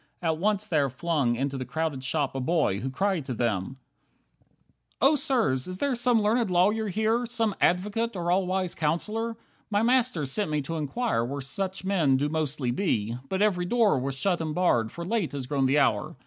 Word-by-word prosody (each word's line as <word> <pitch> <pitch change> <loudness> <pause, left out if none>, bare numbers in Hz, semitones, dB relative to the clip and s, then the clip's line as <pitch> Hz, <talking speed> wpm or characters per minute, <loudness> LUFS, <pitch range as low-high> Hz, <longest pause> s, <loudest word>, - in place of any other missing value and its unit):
At 160 -3 -1
once 210 +2 +1
there 150 -8 +1
flung 140 -3 0
Into 135 +2 -2
the - - -2
crowded 155 -2 -3
shop 140 +1 -1
a 135 - -3
boy, 140 - +1
who 130 +4 -3
cried 190 +4 0
to 125 - -3
them: 115 +1 -1 1.2
6 - - -39
"Oh, 280 +3 +5
sirs, 225 - +1
is 185 0 -5
there 280 +5 0
some 240 -2 +2
learned 225 0 +2
lawyer 205 +5 +2
here, 220 +4 0
Some 225 -3 0
advocate, 210 +5 +1
or 175 -1 -1
all 185 0 +2
wise 185 -1 -1
counsellor? 215 +9 -1 0.3
My 205 0 +1
master 245 - +2
sent 155 +8 -2
me 150 -1 0
to 165 +4 -4
inquire 155 - -1
where 140 +4 -4
Such 190 +8 -3
men 165 -9 +2
do 145 +2 0
mostly 150 -5 -1
be, 120 - -1
but 190 +1 +1
every 180 -4 +1
door 215 - +3
Was 135 +1 -3
shut 175 +4 0
and 155 -2 -3
barred, 120 -11 +2
for 170 - -6
late 200 -5 -1
has 140 -3 -4
grown 135 0 +1
the 135 +3 +2
hour. 115 -8 +1
170 Hz, 200 wpm, -27 LUFS, 135-210 Hz, 1.2 s, Oh